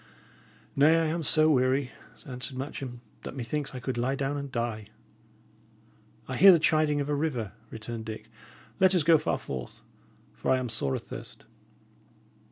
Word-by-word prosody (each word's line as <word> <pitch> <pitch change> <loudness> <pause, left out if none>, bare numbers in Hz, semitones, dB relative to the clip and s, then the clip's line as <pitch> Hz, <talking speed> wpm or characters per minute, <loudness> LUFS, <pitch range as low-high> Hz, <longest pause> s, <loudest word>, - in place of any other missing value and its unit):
"Nay, 155 +4 +6
I 165 - +1
am 165 +2 -1
so 155 0 +4
weary," 130 0 +2 0.3
answered 130 0 -6
Matcham, 130 -3 -6 0.2
"that - - -7
methinks 135 +2 -3
I - - -4
could 125 -1 -3
lie 130 +3 0
down 140 +1 -1
and 140 -1 -5
die." 115 -4 -3 1.4
"I 130 - -3
hear 195 0 +10
the 175 - +7
chiding 155 -2 +2
of 140 - -1
a 150 - 0
river," 140 -9 -1 0.2
returned 110 +1 -6
Dick. 110 -1 -7 0.5
"Let 190 0 +5
us 175 - +3
go 165 +1 +6
so 155 - -7
far - - +1
forth, 65 -2 -7 0.5
for - - -4
I 130 - +5
am 130 -2 -3
sore 70 - -1
athirst." - - -8
135 Hz, 170 wpm, -28 LUFS, 120-150 Hz, 1.4 s, hear